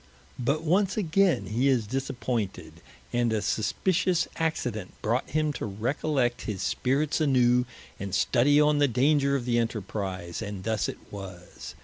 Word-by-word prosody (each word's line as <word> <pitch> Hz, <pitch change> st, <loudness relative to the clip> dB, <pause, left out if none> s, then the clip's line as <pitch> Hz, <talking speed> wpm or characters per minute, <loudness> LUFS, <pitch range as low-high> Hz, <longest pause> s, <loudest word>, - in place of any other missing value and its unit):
But 140 Hz, +6 st, 0 dB
once 190 Hz, +5 st, +2 dB
againe 195 Hz, -1 st, +2 dB
he 120 Hz, +6 st, 0 dB
is 125 Hz, -5 st, +2 dB
disappointed, 120 Hz, -3 st, -3 dB, 0.3 s
and 120 Hz, -1 st, +2 dB
a 110 Hz, -, +1 dB
suspitious 180 Hz, -, +1 dB
accident 125 Hz, -, -2 dB
brought 115 Hz, +4 st, 0 dB
him 155 Hz, 0 st, 0 dB
to 125 Hz, -, -4 dB
recollect 120 Hz, +4 st, -1 dB
his 100 Hz, -4 st, -3 dB
spirits 140 Hz, +5 st, 0 dB
anew, 125 Hz, -4 st, +3 dB, 0.3 s
and 100 Hz, 0 st, -5 dB
studie 145 Hz, +5 st, +3 dB
on 150 Hz, 0 st, +4 dB
the 145 Hz, -, +5 dB
danger 140 Hz, +3 st, +2 dB
of 130 Hz, -3 st, -2 dB
the 120 Hz, -1 st, +2 dB
enterprize, 100 Hz, -6 st, -3 dB
and 100 Hz, -3 st, -5 dB
thus 110 Hz, -1 st, 0 dB
it -, -, -6 dB
was. 95 Hz, -3 st, -9 dB
125 Hz, 145 wpm, -27 LUFS, 110-150 Hz, 0.3 s, the